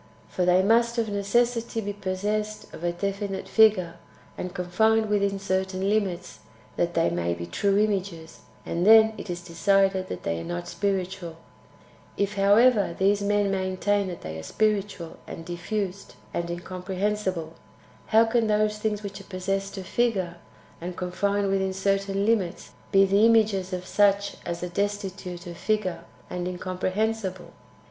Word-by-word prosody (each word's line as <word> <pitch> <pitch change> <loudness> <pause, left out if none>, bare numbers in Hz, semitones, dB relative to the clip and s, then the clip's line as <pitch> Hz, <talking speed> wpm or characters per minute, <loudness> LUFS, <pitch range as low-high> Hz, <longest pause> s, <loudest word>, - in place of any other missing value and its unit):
For 180 - -1
they 180 +1 +4
must 235 +3 +3
of 225 -2 0
necessity 230 +3 0
be 205 -2 -3
possessed 205 +2 -3
of - - -9
a 175 - +1
definite 195 +2 -3
fissure, 190 -6 +4 0.4
and 180 - -5
confined 220 +5 +2
within 200 -1 +1
certain 190 0 -1
limits, 200 -5 -1 0.4
that - - -1
they 85 - +2
may 85 0 -1
be 85 0 -6
true 195 - +1
images; 190 -6 -1 0.3
and 170 - -1
then 220 +2 +7
it - - -8
is 175 0 -4
decided 190 +2 +2
that - - -6
they 85 0 -1
are - - -6
not 85 +1 -4
spirituah 190 -3 -2 0.8
If, 200 0 0
however, 205 -1 +4
these 200 +2 +3
men 205 0 +1
maintain 190 +1 0
that 175 -2 -6
they 80 0 -6
are - - -6
spiritual, 200 - -1
and 165 - -8
diffused, 185 +3 -4 0.2
and 170 0 -2
incomprehensible, 185 0 -3 0.5
how 225 +1 +5
can 225 0 +1
those 210 0 +1
things 210 -1 -2
which 200 -1 -6
are - - -15
possessed 195 +1 -3
of 190 - -6
figure, 190 -6 0 0.4
and 175 +1 -6
confined 200 +3 0
within 190 -1 0
certain 195 +1 0
limits, 205 -5 0 0.2
be 195 -1 +6
the 200 +2 +3
images 210 -4 +3
of 180 0 -4
such 200 0 +2
as 170 0 -3
are 180 - -3
destitute 195 -2 -3
of 170 -1 -8
figure 185 -6 -1 0.2
and 180 0 -4
incomprehensible 185 +2 -2
195 Hz, 155 wpm, -26 LUFS, 180-210 Hz, 0.8 s, then